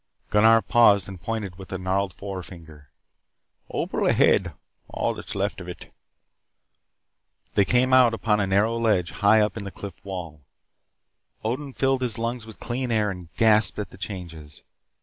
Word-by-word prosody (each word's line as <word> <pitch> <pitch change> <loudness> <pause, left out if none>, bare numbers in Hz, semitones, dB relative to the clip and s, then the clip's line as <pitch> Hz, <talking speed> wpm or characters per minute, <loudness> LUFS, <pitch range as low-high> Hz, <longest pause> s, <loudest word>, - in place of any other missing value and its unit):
Gunnar 110 +2 +5
paused 100 -6 +4
and 95 -3 -9
pointed 105 -6 -4
with 95 - -11
a 95 - -2
gnarled 95 +1 -1
forefinger. 85 -7 -9 0.8
"Opal - - -1
ahead. - - +3 0.4
All - - -1
that - - -10
is - - -4
left - - -2
of - - -9
it." - - -10 1.6
They 100 - +3
came 125 +5 +2
out 125 -2 +6
upon 110 -2 0
a 100 - 0
narrow 105 +4 +2
ledge 105 -7 +1
high 105 +2 +4
up 105 +2 0
in 105 - -5
the 100 - -5
cliff 100 0 -10
wall. 90 -6 -7 1.0
Odin 130 +5 -3
filled 135 0 +1
his 120 -4 -1
lungs 115 0 -3
with 110 - -12
clear 125 +1 -3
air 105 -2 +1
and 90 -3 -10
gasped 110 -3 +4
at 105 - -5
the - - -12
changes. 80 -7 -8
105 Hz, 165 wpm, -24 LUFS, 95-115 Hz, 1.6 s, out